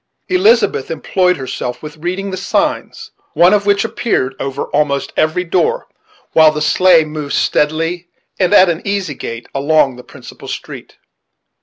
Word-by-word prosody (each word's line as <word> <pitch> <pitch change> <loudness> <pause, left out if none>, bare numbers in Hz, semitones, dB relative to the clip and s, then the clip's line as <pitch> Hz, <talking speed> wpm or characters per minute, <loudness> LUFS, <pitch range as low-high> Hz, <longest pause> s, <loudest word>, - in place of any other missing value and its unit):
Elizabeth 400 +6 +2
employed 180 -2 0
herself 130 -1 -5
with 150 +1 -9
reading 185 +5 -4
the - - -3
signs, 190 +1 -2 0.2
one 175 +3 +5
of 205 -1 +1
which 200 +1 +2
appeared 220 - -1
over 135 +1 -3
almost 140 -1 0
every 155 +3 +1
door; 465 - 0 0.4
while 160 -1 +6
the 150 - -4
sleigh 165 +2 +4
moved 150 -2 -5
steadily, 165 +4 0 0.3
and 185 -1 +2
at 190 -2 +6
an 170 -1 -1
easy 195 -6 -2
gait, 115 -3 -7
along 140 -2 +1
the 125 - -11
principal - - -13
street. - - -8
165 Hz, 150 wpm, -15 LUFS, 150-190 Hz, 0.4 s, while